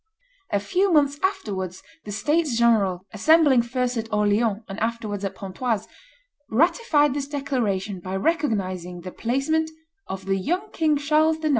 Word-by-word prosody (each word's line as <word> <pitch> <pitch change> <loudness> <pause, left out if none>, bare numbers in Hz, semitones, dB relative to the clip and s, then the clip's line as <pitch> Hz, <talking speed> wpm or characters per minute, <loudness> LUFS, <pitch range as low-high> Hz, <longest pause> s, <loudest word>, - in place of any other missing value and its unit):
A 205 - +1
few 365 - +1
months 285 -3 +3
afterwards 200 - -2 0.2
the 210 - -6
states 285 +5 +1
general, 200 -6 +2
assembling 290 +3 +5
first 250 +1 -2
at 225 0 -4
Orleans 210 +1 +1
and 195 +2 -6
afterwards 220 -3 -2
at 195 - -3
Pontoise, 210 +2 -3 0.6
ratified 295 - +3
this 280 -1 -3
declaration 235 -9 -2
by 185 +2 -5
recognizing 190 - -1
the 185 +1 -7
placement 275 - 0 0.4
of 190 0 -6
"the 195 0 +1
young 360 - -2
King 310 -2 +2
Charles 310 +2 +2
IX. 315 -1 -1
235 Hz, 145 wpm, -24 LUFS, 200-300 Hz, 0.6 s, assembling